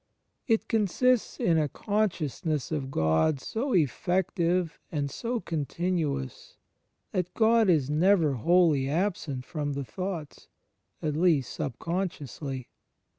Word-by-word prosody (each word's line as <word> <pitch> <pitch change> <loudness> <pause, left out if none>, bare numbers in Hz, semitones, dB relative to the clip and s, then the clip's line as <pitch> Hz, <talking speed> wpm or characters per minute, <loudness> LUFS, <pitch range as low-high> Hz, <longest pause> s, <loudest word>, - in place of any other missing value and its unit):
It 225 -3 +2
consists 225 +3 +1
in 165 -2 +3
a 150 -2 +1
consciousness 165 - -1
of 150 -4 -1
Gk)d 130 - +2
so 240 - -2
effective 175 - +1
and 145 -3 -2
so 240 - -2
continuous 160 - -3 0.5
that 180 -1 -1
God 225 -2 +4
is 155 -7 +3
never 165 -1 +4
wholly 150 +1 +3
absent 155 -6 -1
from 145 -3 -3
the 140 -1 -4
thoughts, 180 -2 -6 0.6
at 150 -2 0
least 155 -6 +2
subconsciously. 145 -3 -4
165 Hz, 110 wpm, -28 LUFS, 145-190 Hz, 0.6 s, God